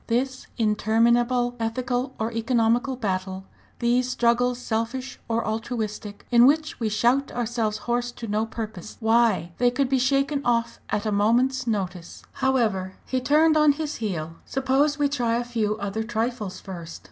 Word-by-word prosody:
This 255 +3 -1
interminable 235 +3 +2
ethical 245 +3 -2
or 220 +1 -2
economical 235 +3 +1
battle, 190 -4 -3 0.3
these 245 +1 +1
struggles 245 0 +2
selfish 245 +2 -3
or 230 0 0
altruistic, 220 -2 -4
in 240 +1 +7
which 310 +2 +1
we 225 -2 0
shout 240 +6 +2
ourselves 230 -3 -1
hoarse 240 0 0
to 235 - -7
no 215 +2 0
purpose 220 -4 -7
why! 225 -6 +2
they 245 - +4
could 255 +1 0
be 265 -1 +2
shaken 275 +2 +1
off 235 -1 0
at 205 - -1
a 215 - 0
moment's 245 +5 +2
notice! 185 -5 -3
"However" 215 -8 0
he 260 -1 -1
turned 305 +4 +4
on 305 -1 +5
his 305 0 -4
heel 165 -7 -4
"suppose 270 +3 +1
we 290 -1 +2
try 245 -5 0
a 240 - -1
few 220 -3 -1
other 200 +1 -3
trifles 225 -3 -3
first. 170 -4 -8
235 Hz, 155 wpm, -25 LUFS, 215-255 Hz, 0.3 s, in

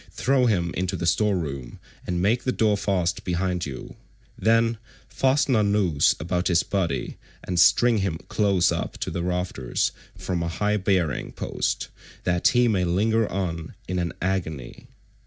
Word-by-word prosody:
Throw 130 -1 +2
him 85 -6 0
into 95 +1 -2
the 85 - -3
store 100 +3 +2
room 70 -7 -5 0.3
and 90 -1 -1
make 115 +5 +2
the 130 - 0
door 110 -4 +2
fast 95 -3 -1
behind 90 -1 -1
you; 65 -2 -8 0.4
then 115 0 +2 0.3
fasten 135 0 +2
a 110 - +4
noose 100 -8 +2
about 90 +3 -1
his 85 -2 +3
body, 85 -10 -2 0.3
and 90 -1 -1
string 115 +5 +5
him 95 -5 -1
close 100 -4 +2
up - - -3
to - - -4
the 85 - -3
rafters 90 -7 -1 0.3
from 90 -2 -3
a 85 - -1
high 105 +5 0
bearing 95 -7 0
post,172 - - -2 0.3
that 90 -1 +2
he 120 0 +4
may 100 -5 +1
linger 105 +5 +1
on 85 -4 -3
in 90 +1 -1
an 85 -1 -1
agony." 80 -9 -3
90 Hz, 160 wpm, -24 LUFS, 85-105 Hz, 0.4 s, string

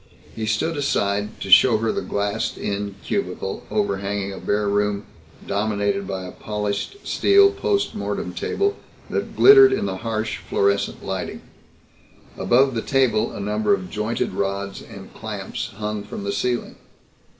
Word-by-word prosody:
He 110 -1 -3
stood 145 +10 0
aside 105 -7 -1
to 95 - -4
show 115 +4 +8
her 110 +1 0
the - - -2
glassed 100 0 -2
in 100 0 -3
cubicle 95 - -3
overhanging 100 -1 -1
a 95 - -7
bare 105 0 0
room 105 0 0 0.4
dominated 100 -1 -1
by 95 -1 -4
a 90 - -7
polished 105 - -3
steel 400 0 +5
post 400 0 0
mortem - - -3
table 405 +1 -1 0.3
that - - -3
glittered 400 -1 +9
in 395 - 0
the 95 - -3
harsh 110 0 -2
fluorescent 100 0 0
lighting. 95 -2 -4 0.9
Above 135 +2 +3
the 115 - -1
table 130 -5 +2
a - - -7
number 105 0 +1
of 95 -2 -8
jointed 105 -1 -2
rods 100 0 -3
and - - -12
clamps - - -5
hung 105 0 -3
from 100 - -7
the 100 - -2
ceiling. 120 +4 -2
105 Hz, 150 wpm, -22 LUFS, 100-115 Hz, 0.9 s, glittered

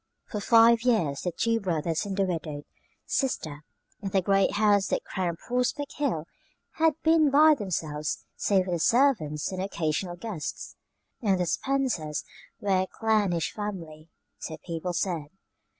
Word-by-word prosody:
For 210 - -5
five 230 +1 +6
years 210 - +1
the 180 - -2
two 230 +6 0
brothers 165 -2 -1
and 195 -1 -4
the 195 - +3
widowed 160 -5 -3 0.4
sister 155 - -2 0.4
in 195 - -3
the 190 0 +2
great 195 0 +3
house 205 -1 +3
that - - -1
crowned 175 -3 -3
Prospect 250 - -2
Hill, 240 - -1 0.5
had 320 -1 +3
been 320 -2 +5
by 305 +3 +7
themselves 160 - -3
save 190 -3 +2
for 185 - -4
the 175 - 0
servants 205 - +2
and 185 -1 -3
the - - -1
occasional 175 -1 -2
guests 180 -4 -6 0.5
and 195 -5 +2
the 180 - +1
Spencers 235 - -1 0.4
were 195 -2 +2
a 190 - -2
clannish 205 -8 0
family, 165 -7 -6 0.3
so 160 - -6
people 170 +1 -3
said. 170 -5 -1
190 Hz, 150 wpm, -27 LUFS, 165-230 Hz, 0.5 s, by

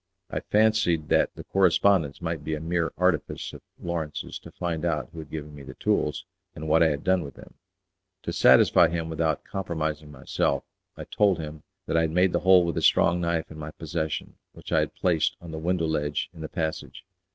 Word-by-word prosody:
I - - -1
fancied 105 -8 +2
that - - +2
the - - -8
correspondence 90 -4 +2
might 85 -1 -3
be 80 - -2
a - - -5
mere 85 +1 -1
artifice 90 -4 0
of - - -10 0.2
Lawrence's 85 -3 -4
to - - -12
find 85 -2 -3
out 75 -8 -1
who 80 - -9
had 80 -2 -9
given 75 -1 -7
me 70 - -10
the 70 - -10
tools, - - 0 0.3
and 80 +1 -6
what 80 +2 +4
I 85 - +6
had 75 -3 -2
done 95 -1 +2
with 70 - -9
them. - - -14 0.7
To - - -3
satisfy 85 - +6
him 85 0 -3
without 80 -1 0
compromising 80 -5 -4
myself 65 -2 -1 0.3
I - - -6
told 100 -4 +2
him 75 -1 -7 0.2
that 80 - 0
I - - +4
had 80 - +1
made 90 +3 +2
the 85 - +2
hole 90 +1 +6
with 85 - -2
a - - 0
strong 85 +1 +4
knife 85 -1 -1
in 80 - -9
my 75 0 -6
possession, 80 0 -4 0.2
which - - -11
I - - +4
had - - -2
placed 85 -4 +1
on 85 -2 -10
the 80 - -5
window 85 +1 0
ledge 75 -1 -1
in 80 - -11
the 80 - -5
passage. 80 +1 -4
80 Hz, 210 wpm, -26 LUFS, 75-85 Hz, 0.7 s, I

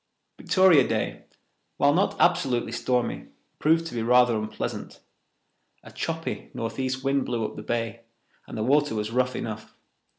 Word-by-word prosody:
Victoria 185 -8 +5
Day, - - -2 0.5
while 145 0 +4
not 190 +5 +1
absolutely 130 -10 +2
stormy, 125 +1 -1 0.3
proved 165 +2 +3
to 165 - -7
be 115 - -2
rather 125 0 +4
unpleasant. 110 0 -5 0.8
A - - -12
choppy 165 0 -4
northeast 130 +3 -3
wind 135 0 +1
blew 115 -3 -2
up - - -6
the - - -7
bay, 115 0 -3 0.5
and - - -7
the 110 - -1
water 145 +1 +2
was 105 0 -2
rough 125 +1 +1
enough. 110 -1 -6
125 Hz, 145 wpm, -26 LUFS, 115-145 Hz, 0.8 s, Victoria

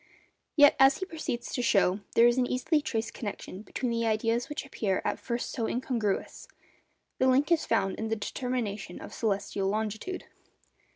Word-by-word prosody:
Yet, 290 -3 +7
as 270 +1 +6
he 375 - -3
proceeds 310 -9 -4
to 245 - 0
show, 195 -4 +3 0.2
there 230 - +7
is 240 +1 +4
an 250 - +2
easily 295 +5 +1
traced 230 -6 -2
connection 205 -3 -6
between 240 +3 -3
the 230 0 0
ideas 225 +3 0
which 295 -1 -4
appear 205 -8 -1
at - - -1
first 240 -1 -3
sight - - -7
so 225 -2 -1
incongruous. 235 -5 -2 0.7
The 260 - +4
link 275 +5 +3
is 335 - +3
found 195 -1 +1
in 220 - -2
the 225 - 0
determination 215 -4 -3
of - - -9
celestial 200 -2 -1
longitude. 220 - -3
235 Hz, 175 wpm, -29 LUFS, 215-260 Hz, 0.7 s, Yet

